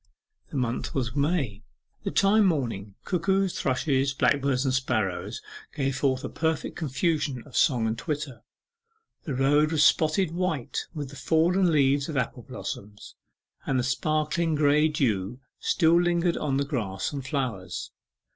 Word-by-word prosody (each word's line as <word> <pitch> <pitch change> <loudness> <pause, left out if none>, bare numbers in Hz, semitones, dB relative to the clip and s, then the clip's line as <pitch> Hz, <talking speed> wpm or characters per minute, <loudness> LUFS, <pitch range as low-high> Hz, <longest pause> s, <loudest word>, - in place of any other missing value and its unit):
The - - -9
month 125 -2 -2
was 125 -3 -1
May 140 - 0 0.4
the 200 - -3
time, 200 +1 +4
morning. 115 - -2
Cuckoos, 190 +1 0
thrushes, 135 0 +1
blackbirds, 135 0 +2
and 130 - +1
sparrows 110 -8 -1 0.3
gave 135 -1 -1
forth 130 0 0
a - - -3
perfect 160 -1 -2
confusion 145 -3 -1
of 140 - -13
song 125 -7 +3
and 110 0 0
twitter. 140 -3 -4 0.8
The 140 - -3
road 145 +4 +3
was 155 -2 +3
spotted 160 +2 +3
white 170 -7 -2
with 145 -3 -4
the - - -11
fallen 170 +5 +2
leaves 140 -1 +2
of 150 - -3
apple 125 -1 -2
blossoms, 105 -1 -8 0.5
and 135 - +1
the 125 - +1
sparkling 155 +5 0
grey 150 +1 +4
dew 115 -6 -1 0.2
still 170 -1 +3
lingered 175 0 +1
on 140 -3 -1
the 140 - 0
grass 110 -7 -3
and 140 -2 -4
flowers. 130 -9 -3
140 Hz, 145 wpm, -26 LUFS, 125-160 Hz, 0.8 s, time